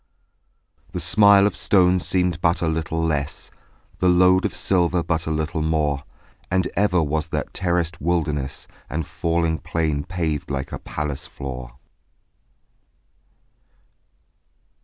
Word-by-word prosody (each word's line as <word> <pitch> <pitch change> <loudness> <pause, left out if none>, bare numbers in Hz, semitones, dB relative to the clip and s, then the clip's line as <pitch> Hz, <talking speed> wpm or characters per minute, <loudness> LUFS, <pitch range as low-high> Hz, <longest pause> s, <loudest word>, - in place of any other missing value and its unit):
The - - -2
smile 100 -1 +6
of 105 - 0
stone 90 -2 +3
seemed 90 -2 0
but 85 +1 +2
a - - +1
little 80 0 -1
less, 75 -2 -2 0.5
The 90 - +3
load 90 +1 +4
of - - -2
silver 90 -2 +1
but 80 -1 -1
a - - -1
little 80 +1 -1
more: 75 -3 0 0.4
And 95 0 +1
ever 90 -4 +2
was 80 +2 -1
that - - -4
terraced 85 -2 -1
wilderness 75 -5 -1 0.2
And 80 0 -3
falling 85 0 -1
plain 75 -1 -1
paved 80 -3 -3
like 70 -1 -3
a - - -5
palace 75 -2 -4
floor. 65 -3 -7
80 Hz, 125 wpm, -22 LUFS, 75-90 Hz, 0.5 s, smile